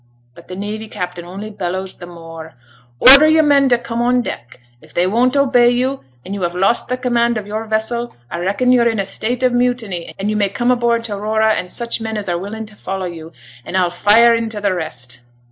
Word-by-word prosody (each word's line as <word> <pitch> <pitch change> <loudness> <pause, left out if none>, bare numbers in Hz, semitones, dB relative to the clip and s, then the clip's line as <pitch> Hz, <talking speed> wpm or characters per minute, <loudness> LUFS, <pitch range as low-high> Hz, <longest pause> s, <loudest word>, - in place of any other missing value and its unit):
But 170 - -16
t' 180 - -7
navy 210 +3 -5
captain 180 -4 -6
only 200 +5 -8
bellows 190 -1 -4
t' 175 - -11
more, 165 -2 -11 0.4
"Order 275 +4 +9
your 315 0 +4
men 280 -2 +4
t' 245 - +4
come 235 0 -4
on 245 +1 +2
deck. 120 - -7 0.2
If 155 - -20
they 175 - +2
won't 245 +8 +1
obey 250 -3 +4
you, 255 +3 0 0.3
and 195 - -6
you 200 - -5
have 175 0 -2
lost 195 +6 +1
the 250 - -2
command 235 -2 +1
of 210 - -5
your 215 +2 -4
vessel, 220 +2 -2 0.2
I 170 - -4
reckon 200 +8 +1
you're 240 -2 +4
in 225 -2 -2
a 195 - -1
state 240 +6 -3
of 250 -1 +3
mutiny, 245 -8 -1
and 200 +2 -2
you - - -2
may 205 -2 +1
come 240 +5 0
aboard 235 -1 +1
t' 225 -3 -5
Aurora 220 +2 +1
and 180 - -3
such 235 +1 -3
men 220 -1 -4
as 205 - -4
are 175 -1 -1
willing 220 +4 -6
t' 215 - -14
follow 190 -2 -5
you, 165 -2 -8 0.3
and 190 - -3
I'll 180 -2 +1
fire 215 +6 +5
int' 225 -2 -2
the 200 -2 0
rest." 125 -8 -5
215 Hz, 230 wpm, -17 LUFS, 185-240 Hz, 0.4 s, Order